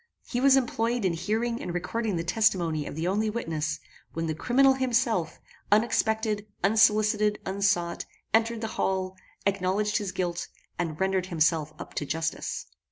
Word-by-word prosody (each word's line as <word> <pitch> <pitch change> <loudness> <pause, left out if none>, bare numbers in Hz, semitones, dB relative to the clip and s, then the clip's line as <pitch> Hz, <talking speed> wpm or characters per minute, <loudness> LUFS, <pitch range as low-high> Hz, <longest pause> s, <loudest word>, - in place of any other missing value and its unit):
He 245 - -2
was 270 0 +6
employed 235 -3 0
in 180 - +2
hearing 220 +7 -1
and 175 -1 -4
recording 210 +4 -2
the 165 - -1
testimony 175 -5 +1
of - - -6
the 160 +2 -2
only 210 +3 +1
witness, 160 -8 -2 0.3
when 165 0 -2
the 160 - -1
criminal 265 - +4
himself, 240 - 0 0.3
unexpected, 220 -1 +2 0.2
unsolicited, 210 0 +4
unsought, 190 -3 0 0.3
entered 225 0 +2
the 225 - -2
hall, 190 -1 -1 0.3
acknowledged 200 +2 +1
his 205 -4 -3
guilt, 175 -2 -2 0.3
and 160 -3 -2
rendered 190 -1 +1
himself 155 -3 +1
up - - -9
to 150 - -2
justice. 160 +2 -3
200 Hz, 150 wpm, -27 LUFS, 170-225 Hz, 0.3 s, was